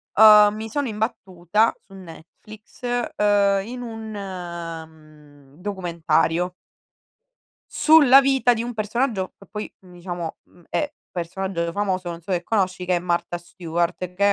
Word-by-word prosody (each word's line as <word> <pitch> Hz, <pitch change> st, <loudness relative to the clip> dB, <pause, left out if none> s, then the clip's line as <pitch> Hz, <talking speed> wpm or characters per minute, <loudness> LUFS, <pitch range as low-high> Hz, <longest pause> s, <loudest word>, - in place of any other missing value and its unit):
Uhm, 210 Hz, -1 st, +8 dB
mi 220 Hz, +1 st, -5 dB
sono 270 Hz, +2 st, -2 dB
imbattuta, 210 Hz, -1 st, 0 dB
su 195 Hz, -, -20 dB
Netflix, 190 Hz, +4 st, -14 dB, 0.3 s
ehm, 200 Hz, -1 st, +3 dB
in 245 Hz, +1 st, -6 dB
un, 225 Hz, -2 st, -7 dB
mhmm, 160 Hz, -6 st, -9 dB
documentario 180 Hz, -2 st, 0 dB, 1.2 s
sulla 285 Hz, -4 st, +7 dB
vita 270 Hz, -2 st, +3 dB
di 230 Hz, 0 st, -3 dB
un 245 Hz, -, -5 dB
personaggio, 215 Hz, -2 st, -1 dB
che 195 Hz, -, -16 dB
poi 210 Hz, 0 st, -6 dB
diciamo, 175 Hz, -2 st, -7 dB
mhmm, 175 Hz, -, -23 dB
è 295 Hz, -1 st, -1 dB, 0.2 s
personaggio 175 Hz, 0 st, -3 dB
famoso, 185 Hz, -2 st, -2 dB
non 170 Hz, 0 st, -7 dB
so 185 Hz, -, -7 dB
se 175 Hz, -1 st, 0 dB
conosci, 185 Hz, -2 st, -1 dB
che 180 Hz, 0 st, +2 dB
è -, -, +1 dB
Marta 175 Hz, 0 st, -1 dB
Stuart, 175 Hz, +1 st, -3 dB
che 200 Hz, +2 st, +3 dB
190 Hz, 135 wpm, -23 LUFS, 170-215 Hz, 1.2 s, Uhm